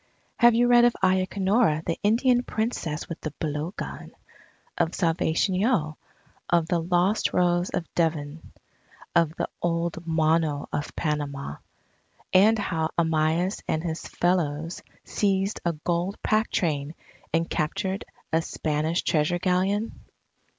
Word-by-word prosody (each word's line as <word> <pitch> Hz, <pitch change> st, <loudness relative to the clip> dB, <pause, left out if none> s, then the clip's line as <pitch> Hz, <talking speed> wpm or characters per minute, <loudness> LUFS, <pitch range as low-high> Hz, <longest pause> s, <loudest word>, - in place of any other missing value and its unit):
Have 240 Hz, -1 st, +6 dB
you 240 Hz, +1 st, +4 dB
read 240 Hz, 0 st, +6 dB
of 240 Hz, -, +3 dB
Ayacanora 190 Hz, -2 st, +2 dB
the 165 Hz, -, -2 dB
Indian 245 Hz, +4 st, +3 dB
Princess 220 Hz, -10 st, -3 dB
with 165 Hz, -, -7 dB
the 155 Hz, -2 st, -5 dB
blowgun, 155 Hz, +4 st, -4 dB, 0.7 s
of 170 Hz, -1 st, 0 dB
Salvation 165 Hz, +1 st, +1 dB
Yeo, 185 Hz, -6 st, +1 dB, 0.5 s
of 170 Hz, -2 st, +2 dB
the 170 Hz, 0 st, +1 dB
lost 180 Hz, +5 st, +1 dB
Rose 175 Hz, 0 st, +2 dB
of 180 Hz, -2 st, -2 dB
Devon, 160 Hz, -2 st, -2 dB, 0.6 s
of 165 Hz, -2 st, +3 dB
the -, -, -2 dB
old 170 Hz, 0 st, -1 dB
Mono 160 Hz, -2 st, +1 dB
of 145 Hz, -, -3 dB
Panama, 145 Hz, -, -3 dB, 0.8 s
and 210 Hz, +4 st, +6 dB
how 165 Hz, -6 st, -1 dB
Amyas 160 Hz, +3 st, +1 dB
and 160 Hz, 0 st, -1 dB
his 165 Hz, -2 st, -4 dB
fellows 165 Hz, -2 st, -1 dB, 0.2 s
seized 195 Hz, 0 st, 0 dB
a 170 Hz, -, +1 dB
gold 175 Hz, +5 st, -2 dB
pack 215 Hz, +1 st, +2 dB
train 150 Hz, -2 st, -1 dB, 0.4 s
and 165 Hz, 0 st, +1 dB
captured 190 Hz, +5 st, -2 dB, 0.3 s
a 160 Hz, -, +3 dB
Spanish 155 Hz, +1 st, -1 dB
Treasure 155 Hz, +2 st, +1 dB
Galleon? 190 Hz, +4 st, 0 dB
170 Hz, 125 wpm, -26 LUFS, 160-190 Hz, 0.8 s, Have